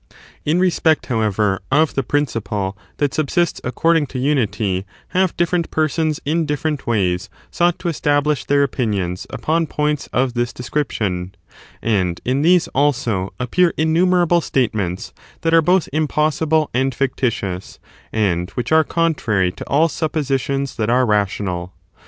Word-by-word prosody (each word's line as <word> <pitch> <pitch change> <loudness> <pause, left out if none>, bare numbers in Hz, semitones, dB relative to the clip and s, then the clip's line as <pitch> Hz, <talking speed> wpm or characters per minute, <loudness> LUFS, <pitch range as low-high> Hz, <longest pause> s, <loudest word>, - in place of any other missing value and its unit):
In 160 +4 +2
respect, 170 -4 +2
however, 105 -4 0
of 155 +2 +3
the 135 - 0
principle 110 -8 -2 0.2
that 145 -2 0
subsists 170 +3 0
according 160 +4 +2
to 130 - -7
unity 115 -8 0 0.3
have 185 -1 +1
different 175 -1 +1
persons 155 0 0
in 160 +2 0
different 150 0 -2
ways 100 -3 0 0.2
sought 175 0 +2
to 180 - -5
establish 145 -3 +1
their 140 0 +3
opinions 100 -10 -2
upon 165 +1 0
points 150 0 -1
of 125 0 +1
this 120 -1 -1
description: 105 -9 -2 0.5
and 95 -6 0
in 130 +3 +1
these, 175 +2 +4
also, 120 -9 0
appear 165 +8 +2
innumerable 175 +2 +3
statements 105 - -1 0.3
that 165 0 +1
are 165 - +7
both 180 +2 +2
impossible 155 0 +1
and 130 +1 0
fictitious, 115 -8 -2 0.3
and 90 -5 0
which 125 - -2
are 160 0 +6
contrary 125 - +1
to - - -9
all 155 +4 +4
suppositions 140 -4 -2
that 110 -1 0
are 125 +2 +3
rational. 95 -4 -1
140 Hz, 135 wpm, -19 LUFS, 110-160 Hz, 0.5 s, are